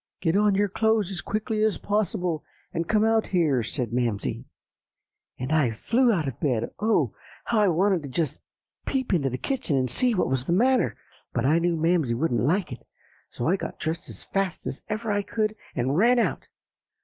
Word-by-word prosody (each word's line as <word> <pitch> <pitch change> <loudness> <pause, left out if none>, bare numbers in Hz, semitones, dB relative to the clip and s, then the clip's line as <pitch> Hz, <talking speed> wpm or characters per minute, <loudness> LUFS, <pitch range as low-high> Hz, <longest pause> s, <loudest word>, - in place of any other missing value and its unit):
"'Get 165 -1 +1
on 205 -1 +4
your 205 +1 +2
clothes 220 -1 +1
as 185 - -3
quickly 215 0 -2
as 215 -2 +2
possible 185 -5 -1 0.3
and 165 -1 -2
come 215 0 +3
out 225 0 +2
here,' 155 -9 +2
said 115 0 -3
Mamsie. 120 -5 -1 0.9
And 130 +3 -4
I 155 -6 +3
flew 235 - +2
out 165 -9 0
of 130 - -5
bed. 125 -7 0
Oh! 205 - +2 0.3
how 230 - +1
I 210 - +4
wanted 185 +1 +2
to 140 - -7
just 150 +1 -1 0.5
peep 260 -5 0
into 140 -7 +2
the 125 - -3
kitchen 240 - -1
and 130 -2 0
see 245 - +2
what 180 - +1
was 130 -1 -1
the 170 - +1
matter, 250 +7 +3 0.4
but 120 0 0
I 155 +5 +4
knew 170 0 +1
Mamsie 160 -7 +2
wouldn't 125 -1 0
like 175 +8 +1
it; - - -8 0.5
so 120 - -3
I 185 +4 +3
got - - -6
dressed 160 +1 -3
as - - -7
fast 195 -3 -2
as - - -4
ever 215 0 -2
I 205 0 +1
could, 215 +1 -1 0.2
and 130 +2 0
ran 235 +8 +4
out. 235 - 0
175 Hz, 195 wpm, -26 LUFS, 140-215 Hz, 0.9 s, on